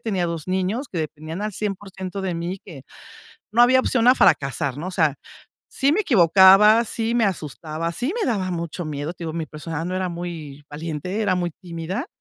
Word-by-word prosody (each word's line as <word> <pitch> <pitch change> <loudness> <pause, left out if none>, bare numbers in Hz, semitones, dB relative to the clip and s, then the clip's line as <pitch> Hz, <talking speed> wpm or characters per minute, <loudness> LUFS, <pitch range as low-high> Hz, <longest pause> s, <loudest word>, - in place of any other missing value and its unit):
tenía 190 -6 -1
2 165 -2 -4
niños 190 +9 -1
que 175 - -4
dependían 155 +3 -5
al 215 - -1
100% 195 -2 -5
de 185 -2 -2
mí 170 +3 -4
que, 155 -9 -11 0.7
no 240 +2 +5
había 260 +1 +6
opción 240 -2 +1
a 250 - +8
fracasar, 145 - +2
¿no? 155 +5 -5
O - - -4
sea, 160 -6 +2 0.6
sí 280 +1 +2
me 395 - +2
equivocaba, 200 - +6
sí 230 +1 -2
me 235 -2 +3
asustaba, 165 -2 -3
sí 250 - -2
me - - 0
daba 190 -4 -1
mucho 170 0 -4
miedo. 150 +1 -4
Te 170 - -8
digo: 160 - -4
"Mi 165 -1 -3
personaje 160 +1 -5
no 185 - -3
era 185 0 -1
muy 165 -5 -7
valiente, 160 +6 -4
era 200 -3 +2
muy 175 -1 -1
tímida", 175 - -4
180 Hz, 195 wpm, -22 LUFS, 160-205 Hz, 0.7 s, a